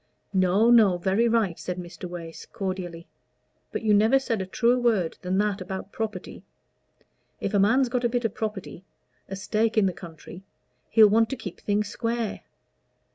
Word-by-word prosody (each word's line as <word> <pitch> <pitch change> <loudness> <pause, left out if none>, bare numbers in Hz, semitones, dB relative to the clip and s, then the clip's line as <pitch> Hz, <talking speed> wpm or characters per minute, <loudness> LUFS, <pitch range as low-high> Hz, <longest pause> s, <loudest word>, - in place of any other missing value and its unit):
"No, 190 +5 +3
no 210 -6 +6
very 195 +6 +1
right," 220 -7 +1
said 180 0 -4
Mr. 175 0 -8
Wace, 170 -2 -8
cordially. 180 -3 -5 0.7
"But - - -4
you 215 -1 +3
never 220 +6 +5
said 240 -6 -2
a 190 - -5
truer 240 +5 +2
word 220 -9 +1
than 185 +1 -1
that 205 -1 0
about 190 +2 -6
property. 220 -1 -5 1.0
If - - -3
a 205 - +3
man's 250 +7 +4
got 245 +1 -2
a 240 - +2
bit 240 0 -1
of 225 - -1
property, 210 -4 -5 0.5
a 195 - -4
stake 215 +3 -1
in 215 - +5
the 185 - 0
country, 170 +1 -11 0.5
he'll 220 -1 +7
want 225 +2 +3
to 270 - -3
keep 200 -8 -8
things 205 0 -1
square. 230 0 -3
205 Hz, 175 wpm, -25 LUFS, 185-230 Hz, 1.0 s, he'll